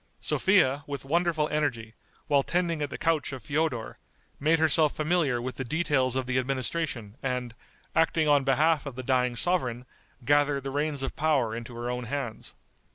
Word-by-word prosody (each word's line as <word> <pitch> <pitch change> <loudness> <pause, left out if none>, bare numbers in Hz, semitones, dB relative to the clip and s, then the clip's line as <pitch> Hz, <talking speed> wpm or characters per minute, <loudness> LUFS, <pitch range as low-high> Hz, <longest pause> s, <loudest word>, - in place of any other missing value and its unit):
Sophia, 150 -8 +2
with 140 -1 -5
wonderful 165 0 +1
energy, 120 -8 -2 0.3
while 140 -1 +3
tending 170 +1 -1
at 145 - -1
the - - -6
couch 165 -3 0
of 130 -4 -7
Feodor, 145 -4 -2 0.4
made 160 +3 +3
herself 155 -1 +4
familiar 155 -5 +1
with 125 +2 -5
the 130 - -2
details 135 -3 0
of 130 -1 -1
the 130 +1 0
administration, 130 -4 -3
and, 125 -3 -3 0.4
acting 160 -1 +2
on 145 -2 +4
behalf 150 +3 +2
of 135 - -6
the 130 - -6
dying 125 -1 +1
sovereign, 125 -5 -1 0.4
gathered 145 0 +2
the 135 - -4
reins 145 -1 -2
of - - -4
power 140 -7 +1
into 115 +1 -7
her 120 +1 -3
own 125 0 -4
hands. 120 -2 -5
140 Hz, 170 wpm, -27 LUFS, 125-155 Hz, 0.4 s, herself